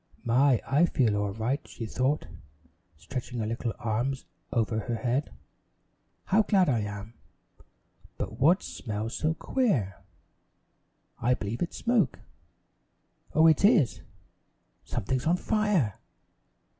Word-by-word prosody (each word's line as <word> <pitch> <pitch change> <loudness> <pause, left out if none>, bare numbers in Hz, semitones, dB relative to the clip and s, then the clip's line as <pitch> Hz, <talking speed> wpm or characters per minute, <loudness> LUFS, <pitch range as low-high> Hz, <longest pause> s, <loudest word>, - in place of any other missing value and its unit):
"My, 125 +1 +4
I 150 +6 +3
feel 115 -9 +2
all 105 -1 0
right," 120 +7 -1
she 115 - -7
thought, 130 +6 0 0.7
stretching 125 - -6
her 110 - -1
little 115 +1 -3
arms 120 +4 -2 0.3
over 110 -2 0
her 120 +2 -3
head. 125 +4 -1 0.9
"How 210 +3 +3
glad 195 -5 +3
I 120 -4 +2
am! 105 +1 -6 1.0
But - - -5
what 170 +8 +4
smells 110 +1 -5
so 155 +3 0
queer? 145 - 0 1.2
I 125 +2 +2
believe 105 +2 -5
it's 175 - -2
smoke! 230 - +1 1.2
Oh, 160 +1 +6
it 160 +2 +5
is! 200 - +4 0.8
Something's 130 +5 -2
on 175 +2 +3
fire!" 205 - +1
125 Hz, 120 wpm, -28 LUFS, 110-160 Hz, 1.2 s, Oh